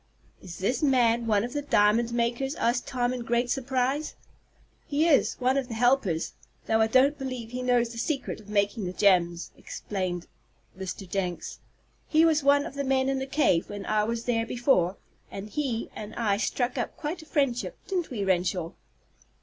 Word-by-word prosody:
"Is 175 Hz, -3 st, -9 dB
this 235 Hz, +7 st, -1 dB
man 240 Hz, -5 st, +3 dB
one 210 Hz, -2 st, +3 dB
of 245 Hz, +2 st, -5 dB
the 290 Hz, -, -1 dB
diamond 230 Hz, -3 st, +3 dB
makers?" 240 Hz, +4 st, -1 dB
asked 240 Hz, +1 st, 0 dB
Tom, 245 Hz, -1 st, 0 dB
in 255 Hz, -, -4 dB
great 240 Hz, +1 st, 0 dB
surprise. 265 Hz, +3 st, -1 dB, 0.7 s
"He 305 Hz, +3 st, +2 dB
is 300 Hz, -5 st, +3 dB
one 260 Hz, +2 st, +1 dB
of 270 Hz, -3 st, -1 dB
the 230 Hz, -, -6 dB
helpers, 230 Hz, -9 st, +1 dB, 0.3 s
though 220 Hz, 0 st, +2 dB
I 220 Hz, -, +4 dB
don't 270 Hz, +5 st, +3 dB
believe 255 Hz, -4 st, -5 dB
he 250 Hz, +1 st, -4 dB
knows 245 Hz, -2 st, +2 dB
the 230 Hz, 0 st, -7 dB
secret 275 Hz, +3 st, -2 dB
of 210 Hz, -1 st, -15 dB
making 205 Hz, 0 st, 0 dB
the 180 Hz, -, -4 dB
gems," 175 Hz, -4 st, +2 dB
explained 185 Hz, -3 st, -4 dB, 0.5 s
Mr. 190 Hz, +1 st, -6 dB
Jenks. 180 Hz, -3 st, -3 dB, 0.5 s
"He 320 Hz, +1 st, +4 dB
was 315 Hz, -2 st, +3 dB
one 285 Hz, +1 st, +4 dB
of -, -, -7 dB
the 280 Hz, 0 st, -3 dB
men 265 Hz, 0 st, +1 dB
in 270 Hz, 0 st, 0 dB
the 265 Hz, -, -4 dB
cave 270 Hz, -, +2 dB
when 205 Hz, -1 st, -6 dB
I 215 Hz, -1 st, +1 dB
was 230 Hz, +1 st, -2 dB
there 230 Hz, -2 st, 0 dB
before, 205 Hz, -8 st, +2 dB, 0.3 s
and 195 Hz, +2 st, -7 dB
he 265 Hz, -7 st, -2 dB
and 215 Hz, 0 st, -7 dB
I 210 Hz, -4 st, +1 dB
struck 245 Hz, +3 st, -1 dB
up 240 Hz, -, -4 dB
quite 320 Hz, +3 st, -4 dB
a 315 Hz, -, -15 dB
friendship; 275 Hz, -7 st, 0 dB
didn't 365 Hz, -4 st, -1 dB
we, 210 Hz, -6 st, -3 dB
Renshaw?" 180 Hz, -2 st, 0 dB
240 Hz, 185 wpm, -27 LUFS, 205-270 Hz, 0.7 s, I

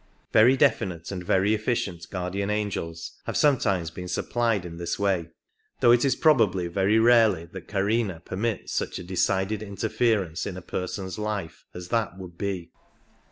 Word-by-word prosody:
Very 125 Hz, +5 st, +6 dB
definite 95 Hz, -, +1 dB
and 90 Hz, -2 st, -5 dB
very 95 Hz, +4 st, +2 dB
efficient 105 Hz, -6 st, -2 dB
guardian 95 Hz, +2 st, -3 dB
angels 95 Hz, -6 st, -3 dB
have -, -, -2 dB
some 145 Hz, -4 st, +4 dB
75 -, -, -13 dB, 0.2 s
times 85 Hz, -1 st, -6 dB
been 90 Hz, +1 st, -7 dB
supplied 115 Hz, -1 st, 0 dB
in 85 Hz, -1 st, -8 dB
this 85 Hz, 0 st, -3 dB
way, 95 Hz, -5 st, 0 dB, 0.5 s
though 120 Hz, -, +6 dB
it 120 Hz, 0 st, +5 dB
is 135 Hz, -3 st, +3 dB
probably 110 Hz, -, +3 dB
very 95 Hz, +5 st, +2 dB
rarely 110 Hz, -7 st, +5 dB
that 85 Hz, -, -10 dB
Karma 100 Hz, -2 st, 0 dB
permits 100 Hz, +6 st, -3 dB
such -, -, -2 dB
a -, -, -6 dB
decided 95 Hz, +3 st, 0 dB
interference 105 Hz, -3 st, -1 dB
in 90 Hz, -, -5 dB
a -, -, -7 dB
person's 95 Hz, +3 st, -4 dB
life 105 Hz, -6 st, -4 dB
as 90 Hz, 0 st, -8 dB
that 110 Hz, -6 st, -1 dB
would 90 Hz, -3 st, -9 dB
be. 95 Hz, -2 st, -4 dB
100 Hz, 165 wpm, -26 LUFS, 90-110 Hz, 0.5 s, Very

